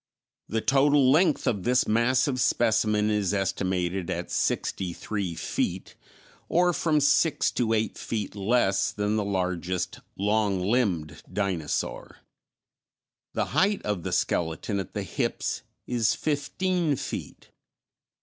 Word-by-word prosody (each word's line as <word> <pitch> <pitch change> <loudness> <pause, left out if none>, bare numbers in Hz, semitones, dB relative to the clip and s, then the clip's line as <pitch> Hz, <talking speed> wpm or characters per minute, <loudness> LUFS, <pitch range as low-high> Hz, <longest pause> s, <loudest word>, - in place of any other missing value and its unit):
The 110 0 0
total 140 0 +4
length 160 0 +3
of 100 -4 0
this 125 +5 +2
massive 125 +4 +2
specimen 110 -3 +2
is 105 -2 +1
estimated 95 -2 -1
at - - -3
sixty 90 -2 -1
three 95 -3 -4
feet, 80 - -3 0.6
or 175 +1 +3
from 155 -2 +2
six 145 +2 +3
to 115 -2 0
eight 110 0 -1
feet 105 -3 -4
less 100 -1 +2
than 105 +1 -1
the 110 - +1
largest 90 -2 -2 0.2
"long 105 -1 +1
limbed" 90 -7 0
dinosaur. 90 -6 -2 1.2
The - - +1
height 200 +2 +2
of 105 -4 -2
the - - -4
skeleton 85 +5 -1
at 95 - -7
the 105 - -2
hips 95 - -2 0.2
is 115 -4 +1
fifteen 165 +2 0
feet. - - -7
105 Hz, 120 wpm, -27 LUFS, 95-130 Hz, 1.2 s, total